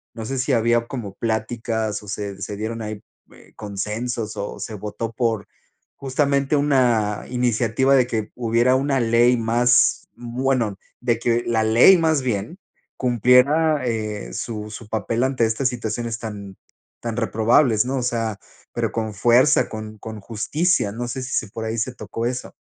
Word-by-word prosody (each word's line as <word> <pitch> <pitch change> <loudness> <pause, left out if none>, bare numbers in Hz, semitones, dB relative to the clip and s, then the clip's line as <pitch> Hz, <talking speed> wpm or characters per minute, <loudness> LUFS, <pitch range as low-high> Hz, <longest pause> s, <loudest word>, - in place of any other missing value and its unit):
no 115 - -6
sé 135 +4 -3
si 135 +2 0
había 120 0 +2
como 115 -8 -6
pláticas 110 -1 -2
o - - -13
se 100 -1 -5
se 105 +1 -5
dieron 115 +2 -4
ahí, 105 -1 -6 0.3
eh, - - -19
consensos 105 +2 -4
o 100 - -5
se 110 - -5
votó 105 +3 -5
por 115 -4 -1 0.5
justamente 140 +1 +1
una 120 -7 +2
iniciativa 125 +2 +2
de 130 -2 +4
que 110 -3 -3
hubiera 120 +1 +2
una 135 0 +1
ley 120 +2 +4
más 120 +2 +3
bueno, 120 -3 -1 0.2
de 120 -2 +1
que 120 0 +1
la 115 -1 +2
ley 115 +12 +7
más 160 -3 +2
bien, 115 - -2 0.4
cumpliera, 130 +5 +3
eh, 110 - -3
su 105 - -5
su 105 +1 -9
papel 115 +2 -1
ante 130 -2 +1
estas 115 +4 +1
situaciones 115 -1 -4
tan 100 -3 -7 0.5
tan 115 -1 -4
reprobables, 115 0 +3
¿no?, 135 +2 -2
o 125 - -1
sea, 115 -3 -1 0.4
pero - - -1
con 110 -2 -3
fuerza, 120 +8 +4
con 110 0 -7
con 110 0 -8
justicia, 115 - 0
no 120 +2 -4
sé 130 +1 -4
si 130 - -6
si 110 - 0
por 110 +1 -5
ahí 110 +1 -3
se 125 +3 -2
tocó 115 -1 -5
eso. 125 0 -5
115 Hz, 165 wpm, -22 LUFS, 110-125 Hz, 0.5 s, ley